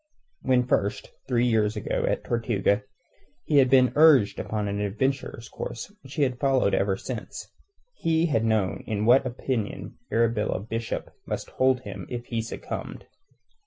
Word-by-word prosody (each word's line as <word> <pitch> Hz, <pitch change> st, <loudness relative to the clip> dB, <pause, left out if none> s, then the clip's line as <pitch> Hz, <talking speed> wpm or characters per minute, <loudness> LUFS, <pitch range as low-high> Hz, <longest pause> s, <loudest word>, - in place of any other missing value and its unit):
When 125 Hz, -1 st, +3 dB
first, 100 Hz, -4 st, -1 dB, 0.2 s
three 120 Hz, -2 st, +2 dB
years 110 Hz, -3 st, +2 dB
ago, -, -, -1 dB
at -, -, -1 dB
Tortuga 110 Hz, -3 st, +1 dB, 0.6 s
he 150 Hz, -, +2 dB
had 130 Hz, -2 st, +6 dB
been 130 Hz, -1 st, +5 dB
urged 145 Hz, -9 st, +6 dB
upon 105 Hz, -1 st, -2 dB
the 100 Hz, 0 st, -2 dB
adventurer's 115 Hz, +2 st, -2 dB
course 205 Hz, -, -7 dB
which -, -, -11 dB
he 150 Hz, -, +2 dB
had 130 Hz, -2 st, -1 dB
followed 135 Hz, -7 st, +2 dB
ever 95 Hz, -1 st, +1 dB
since, 120 Hz, 0 st, -7 dB, 0.5 s
he 165 Hz, 0 st, +2 dB
had 135 Hz, -9 st, +1 dB
known 110 Hz, -4 st, 0 dB
in 105 Hz, -1 st, -1 dB
what 130 Hz, +3 st, +5 dB
opinion 120 Hz, -3 st, -4 dB
Arabella 115 Hz, -3 st, +1 dB
Bishop 115 Hz, +3 st, -4 dB
must -, -, -4 dB
hold 130 Hz, -1 st, +2 dB
him 100 Hz, -5 st, -8 dB
if 120 Hz, -1 st, -5 dB
he 115 Hz, -2 st, -2 dB
succumbed. 115 Hz, -, -6 dB
115 Hz, 155 wpm, -26 LUFS, 105-130 Hz, 0.6 s, had